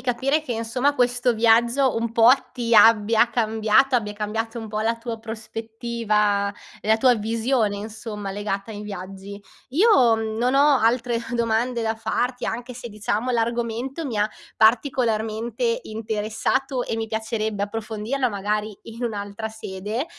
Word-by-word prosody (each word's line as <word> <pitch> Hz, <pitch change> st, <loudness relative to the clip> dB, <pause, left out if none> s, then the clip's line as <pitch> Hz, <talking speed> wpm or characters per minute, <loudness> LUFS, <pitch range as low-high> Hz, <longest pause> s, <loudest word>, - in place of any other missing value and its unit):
capire 265 Hz, +5 st, 0 dB
che, 305 Hz, -, -9 dB
insomma, 230 Hz, +5 st, 0 dB
questo 245 Hz, -1 st, +2 dB
viaggio 235 Hz, +3 st, +3 dB
un 230 Hz, 0 st, -1 dB
po' 230 Hz, 0 st, +5 dB, 0.2 s
ti 235 Hz, -2 st, -1 dB
abbia 225 Hz, +1 st, +6 dB
cambiata, 225 Hz, +3 st, +2 dB
abbia 210 Hz, -3 st, -2 dB
cambiato 220 Hz, +2 st, -3 dB
un 225 Hz, -, -6 dB
po' 215 Hz, 0 st, -3 dB
la 225 Hz, +1 st, 0 dB
tua 230 Hz, 0 st, -5 dB
prospettiva, 220 Hz, -2 st, -1 dB, 0.3 s
la 220 Hz, +1 st, +3 dB
tua 250 Hz, +2 st, +4 dB
visione, 225 Hz, 0 st, 0 dB
insomma, 210 Hz, -1 st, -6 dB
legata 205 Hz, +1 st, -4 dB
ai 205 Hz, -, -7 dB
viaggi. 195 Hz, 0 st, -8 dB, 0.3 s
Io 270 Hz, -, +4 dB
non 225 Hz, +3 st, -1 dB
ho 285 Hz, -1 st, +5 dB
altre 235 Hz, +1 st, +1 dB, 0.2 s
domande 235 Hz, +1 st, 0 dB
da 225 Hz, 0 st, 0 dB
farti, 240 Hz, +3 st, -2 dB
anche 245 Hz, +2 st, -4 dB
se, 240 Hz, 0 st, -8 dB
diciamo, 215 Hz, +3 st, -2 dB
l'argomento 235 Hz, +5 st, -2 dB
mi 250 Hz, -6 st, -3 dB
ha 210 Hz, +1 st, +2 dB, 0.3 s
particolarmente 230 Hz, -, +1 dB
interessato 220 Hz, -, -2 dB
e 225 Hz, -, -3 dB
mi 225 Hz, 0 st, -2 dB
piacerebbe 220 Hz, -2 st, -2 dB
approfondirlo 225 Hz, +5 st, -2 dB
magari 210 Hz, 0 st, -2 dB
in 230 Hz, +2 st, -6 dB
un'altra 205 Hz, -1 st, -4 dB
sede. 215 Hz, +3 st, -5 dB
225 Hz, 140 wpm, -23 LUFS, 215-245 Hz, 0.3 s, abbia